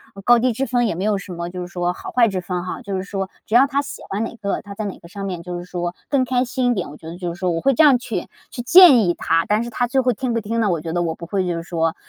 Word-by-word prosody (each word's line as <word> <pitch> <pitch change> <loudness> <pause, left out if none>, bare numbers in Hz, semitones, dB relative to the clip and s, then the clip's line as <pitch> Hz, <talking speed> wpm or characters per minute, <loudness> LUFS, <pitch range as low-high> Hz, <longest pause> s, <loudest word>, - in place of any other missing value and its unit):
呃 195 - -9
高 240 +1 +6
低 250 +2 +2
之 265 +5 -1
分， 240 -1 +1
也 170 - -2
没 185 - -3
有 210 -1 +1
什 195 -2 -8
么 170 0 -5
就 180 0 -6
是 175 - -5
说 175 0 -2
好 - - -8
坏 240 -2 +4
之 190 -3 -2
分 180 0 -3
哈， 185 - -5
就 200 -2 -4
是 185 - -2
说 195 -1 -4 0.2
只 220 - -1
要 255 +3 +7
他 280 0 0
喜 285 - -8
欢 205 +3 -2
哪 230 - -5
个， 200 -3 -3
他 200 -1 -10
在 215 +1 -4
哪 195 - -5
个 170 - -14
上 195 +2 -7
面 180 -3 -4
就 175 0 -5
是 - - -7
说 175 -1 -4
更 270 -3 +2
开 250 0 +1
心 245 0 0
一 - - +3
点， 185 -8 -3
我 150 - -11
觉 160 - -12
得 170 - -7
就 175 -2 -4
是 175 - -13
说 185 -2 0
我 165 -1 -2
会 275 - +3
这 315 - +4
样 275 -4 +7
去 225 -7 -4 0.2
去 240 - -5
建 330 -1 +8
议 175 -5 +2
他。 165 0 +1
但 210 +2 +2
是 235 - -5
他 245 +1 -1
最 265 +2 +2
后 250 -1 +2
听 245 +1 -2
不 230 - 0
听 230 +2 -2
呢， 215 - +2
我 170 -4 0
觉 165 - -5
得 175 - 0
我 165 -1 -2
不 170 - -9
会 190 +1 -1
就 175 - -1
是 165 - -4
说 165 -1 -1
200 Hz, 370 characters per minute, -21 LUFS, 175-240 Hz, 0.2 s, 建